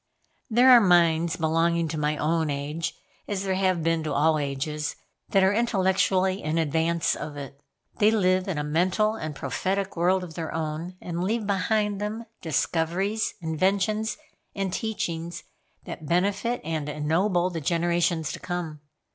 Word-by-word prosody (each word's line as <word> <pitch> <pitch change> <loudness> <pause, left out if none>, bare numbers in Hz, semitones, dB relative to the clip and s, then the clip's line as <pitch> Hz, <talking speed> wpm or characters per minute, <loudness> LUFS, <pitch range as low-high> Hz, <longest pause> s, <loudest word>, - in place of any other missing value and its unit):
There 245 +3 +6
are 245 -2 +9
minds 170 -3 +4
belonging 165 +1 +1
to 155 - -3
my 150 0 0
own 160 +1 +1
age, 145 +3 -3 0.3
as 200 -2 -2
there 190 -1 0
have 185 -3 +1
been 165 0 +1
to 155 -2 -3
all 155 +2 +3
ages, 150 +2 -3 0.3
that 195 -1 +4
are 190 +1 +4
intellectually 190 -3 +2
in 155 +2 -1
advance 165 +1 +1
of 150 -1 -6
it. 140 0 -8 0.4
They 210 - +6
live 185 -3 +2
in 185 -5 -2
a 150 - -1
mental 180 +8 +1
and 155 -9 -5
prophetic 195 +6 -2
world 180 +2 +2
of 170 -3 -8
their 160 -1 -4
own, 160 +3 -4
and 175 0 -3
leave 220 +3 -1
behind 205 +1 0
them 215 +2 -4 0.2
discoveries, 175 +7 0
inventions 195 +6 0 0.4
and 195 -2 -2
teachings 170 -7 -3 0.4
that 155 - -7
benefit 200 +8 0
and 155 -2 -3
ennoble 175 +5 +1
the 165 -2 -4
generations 170 0 +1
to - - -6
come. 170 -4 -5
170 Hz, 155 wpm, -26 LUFS, 160-195 Hz, 0.4 s, are